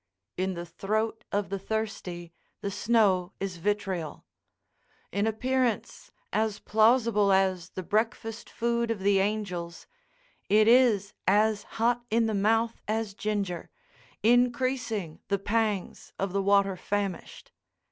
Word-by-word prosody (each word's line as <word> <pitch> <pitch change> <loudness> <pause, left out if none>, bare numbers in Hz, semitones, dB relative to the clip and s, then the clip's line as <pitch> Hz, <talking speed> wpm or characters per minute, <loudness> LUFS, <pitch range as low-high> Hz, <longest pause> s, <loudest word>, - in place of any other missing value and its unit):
In 185 0 -1
the 170 0 -5
throat 215 +6 -2
of 205 0 -1
the 195 0 -3
thirsty 190 -5 -4 0.3
the 200 - -3
snow 205 -3 +2
is 190 -2 -4
vitriol. 190 -3 -2 0.9
In 200 +3 0
appearance 250 +1 -1 0.2
as 215 -1 +1
plausible 220 -2 +3
as 190 -2 +2
the 185 - -6
breakfast 225 +3 -2
food 235 0 -1
of 225 -4 -2
the 195 0 +3
angels, 190 -4 -2 0.6
it 215 +1 +5
is 230 -5 +4
as 210 +2 +3 0.2
hot 240 +1 +2
in 230 +1 +2
the 220 - -1
mouth 225 +3 +1
as 215 -1 -1
ginger, 200 -4 -3 0.5
increasing 240 -6 +1
the 200 - +1
pangs 205 -1 -2
of 195 -1 -2
the 200 - +1
water 200 -1 +3
famished. 200 0 -4
205 Hz, 125 wpm, -28 LUFS, 195-225 Hz, 0.9 s, it